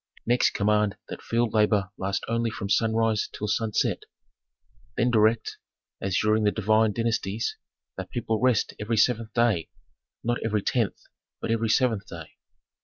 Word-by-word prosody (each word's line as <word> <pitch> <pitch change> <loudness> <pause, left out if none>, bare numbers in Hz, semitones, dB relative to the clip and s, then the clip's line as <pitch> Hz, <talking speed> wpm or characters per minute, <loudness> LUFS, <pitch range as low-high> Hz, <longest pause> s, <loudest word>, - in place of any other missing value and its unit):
"Next 120 +1 +2
command 105 0 +1
that - - -7
field 115 -1 0
labor 105 -3 +2
last 95 +1 -3
only 115 0 0
from 100 -2 -5
sunrise 110 +1 +1
till 105 - -5
sunset. 110 +1 0 1.0
Then 120 +2 +2
direct, 110 0 +2 0.4
as 95 -1 0
during 110 +1 +2
the 105 - +4
divine 110 +1 +2
dynasties, 115 -1 -1 0.4
that - - -6
people 110 -2 -2
rest 125 -4 +2
every 110 +2 -1
seventh 115 0 +2
day; 115 -9 +2 0.5
not 120 +1 0
every 105 -3 0
tenth, 115 -6 -1 0.4
but - - -3
every 115 -1 0
seventh 110 -3 +1
day. 85 -4 -9
110 Hz, 145 wpm, -26 LUFS, 105-115 Hz, 1.0 s, the